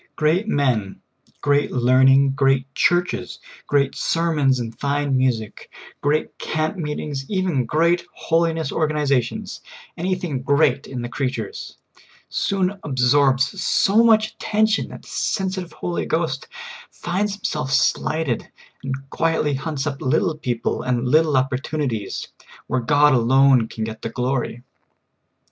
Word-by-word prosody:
Great 165 +7 +1
men, 125 - 0 0.4
great 145 0 +2
learn 130 +1 +4
ing, 135 +1 +5
great 135 -1 +2
Churches, 175 +4 0 0.3
great 140 -1 +2
sermons 150 -6 +1
and 115 -1 -6
fine 140 -1 0
music, 125 -5 -1 0.3
great 150 +2 -1
camp 155 +3 -2
meetings, 150 -4 -4
even 180 - 0
great 170 +5 +2
holiness 165 -2 0
organiza 150 -4 +1
tions 115 - -7 0.2
— - - -22
anything 180 -6 -2
great 140 0 +2
in 125 -3 -5
the - - -3
creatures 135 - -4 0.3
— - - -27 0.2
soon 195 0 -1
absorbs 135 +4 +2
so 210 +4 +3
much 215 -2 +4
attention 220 0 0
that - - -11
the - - -17
sensitive 190 -2 -2
Holy 175 -1 -3
Ghost 160 -4 -1 0.4
finds 195 +4 -2
Himself 155 -10 -3
slighted, 140 +1 0 0.3
and 135 0 -5
quietly 160 -3 0
hunts 140 +1 -3
up 140 -2 -4
little 155 +5 +1
people 125 -6 -2
and 125 0 -1
little 155 +1 +3
opportunities, 130 -3 -2 0.4
where 130 - -1
God 145 +3 +4
alone 130 0 +4
can 110 - -5
get 110 0 -6
the - - -4
glory. 125 0 -2
145 Hz, 130 wpm, -21 LUFS, 130-165 Hz, 0.4 s, ing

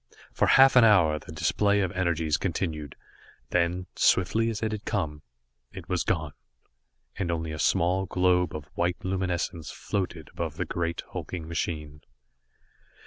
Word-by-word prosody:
For - - +2
half 135 0 +7
an 125 - +8
hour 90 -9 +5
the - - -12
display 100 +6 +1
of 95 -3 -1
energies 85 -4 0
continued. 80 -5 -3 0.6
Then, 90 +1 +1
swiftly 110 +5 +3
as 110 -1 -4
it 110 - 0
had 110 -1 -4
come, 80 -8 -2 0.5
it 90 -3 -10
was 90 -2 0
gone, 80 -4 -1 0.9
and 90 - -1
only 80 -1 -2
a 75 - -6
small 90 +7 +2
globe 90 -2 +2
of 75 -2 -6
white 85 0 0
luminescence 90 -3 -2
floated 90 -6 -4
above - - -4
the - - -1
great 85 -1 -3
hulking 85 -3 -5
machine. 75 -2 -4
85 Hz, 145 wpm, -27 LUFS, 80-95 Hz, 0.9 s, an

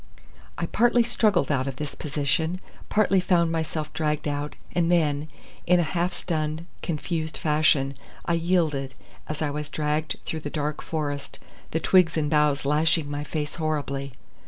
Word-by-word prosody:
I - - -1
partly 240 0 +3
struggled 215 -8 +2
out 130 -1 +1
of 135 - -3
this 145 +1 -4
position, 155 +4 -1 0.3
partly 205 -2 +3
found 175 -3 +3
myself 160 -1 -2
dragged 150 -1 -1
out, 145 0 -2 0.2
and 170 -1 +2
then, 150 -3 +2 0.4
in 180 0 +5
a - - +3
half 175 +3 0
stunned, 155 -2 -2 0.2
confused 160 -1 -2
fashion, 150 -3 +3 0.3
I 170 - +1
yielded, 165 -6 +1 0.3
as 155 +1 -2
I 145 - 0
was 150 0 -4
dragged 150 +1 -1
through 160 - -3
the 145 - -5
dark 150 0 -2
forest, 145 -3 -3 0.3
the 160 - 0
twigs 170 -1 +4
and 150 -2 0
boughs 150 -2 +3
lashing 150 +1 +2
my 145 0 -2
face 150 0 -3
horribly. 140 -3 -2
155 Hz, 160 wpm, -26 LUFS, 145-170 Hz, 0.4 s, in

